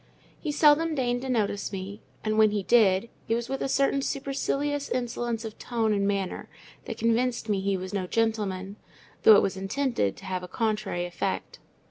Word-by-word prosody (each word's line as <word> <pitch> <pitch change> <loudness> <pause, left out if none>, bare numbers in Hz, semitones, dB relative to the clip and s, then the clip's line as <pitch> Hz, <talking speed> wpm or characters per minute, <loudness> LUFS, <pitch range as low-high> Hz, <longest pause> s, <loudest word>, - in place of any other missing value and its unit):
He 305 - -3
seldom 305 +2 +4
deigned 245 -2 0
to 265 - -5
notice 205 -5 0
me; 195 +2 -6 0.2
and, 215 0 0
when 215 -1 +7
he 205 -1 -1
did, 200 -2 +4 0.2
it 225 - +2
was 235 +1 -3
with 270 0 -3
a - - -1
certain 275 +1 +2
supercilious 280 +1 -2
insolence 240 -2 -2
of 220 -1 -8
tone 225 -3 0
and 200 -1 +1
manner 195 -2 -2 0.4
that - - -5
convinced 235 +1 +1
me 200 -2 +1
he 195 0 0
was 185 +2 -6
no 190 -2 -1
gentleman: 205 -3 -1 0.4
though 220 - +9
it - - +5
was 195 - -1
intended 195 - -1
to - - -12
have 185 -1 -2
a 180 - -7
contrary 215 -4 -1
effect. 175 +2 -3
220 Hz, 185 wpm, -27 LUFS, 195-250 Hz, 0.4 s, though